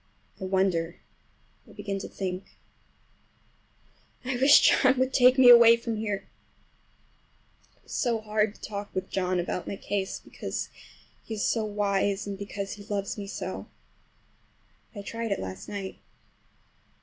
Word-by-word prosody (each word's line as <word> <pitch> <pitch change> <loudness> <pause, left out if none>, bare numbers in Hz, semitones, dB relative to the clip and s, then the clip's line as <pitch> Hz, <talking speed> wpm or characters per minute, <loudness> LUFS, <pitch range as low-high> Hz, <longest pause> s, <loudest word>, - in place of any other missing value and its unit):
I 190 - -4
wonder—I 185 -3 -4
begin 195 -1 -4
to - - -6 2.2
think—I 260 0 -1
wish 270 +3 +7
John 260 0 +5
would 260 +1 +1
take 255 0 +6
me 260 -1 +7
away 235 -1 +9
from 230 -1 -4
here! 210 -2 -3 1.6
It - - -33
is - - -15
so 235 -4 +1
hard 215 0 0
to - - -20
talk 205 -1 -5
with 185 0 -3
John 185 -1 0
about 175 +1 -3
my - - -3
case, 195 0 -3
because - - -5 0.5
he 225 - -6
is 205 - -1
so 225 - +1
wise, 200 -1 0
and 200 -1 -4
because 200 0 -5
he 205 - -10
loves 200 -2 -3
me 205 -2 -6
so. - - -5 1.2
But 205 - -8
I - - -12
tried 230 +1 -4
it 200 - 0
last 95 0 -7
night. 195 -2 -6
205 Hz, 145 wpm, -27 LUFS, 195-230 Hz, 2.2 s, away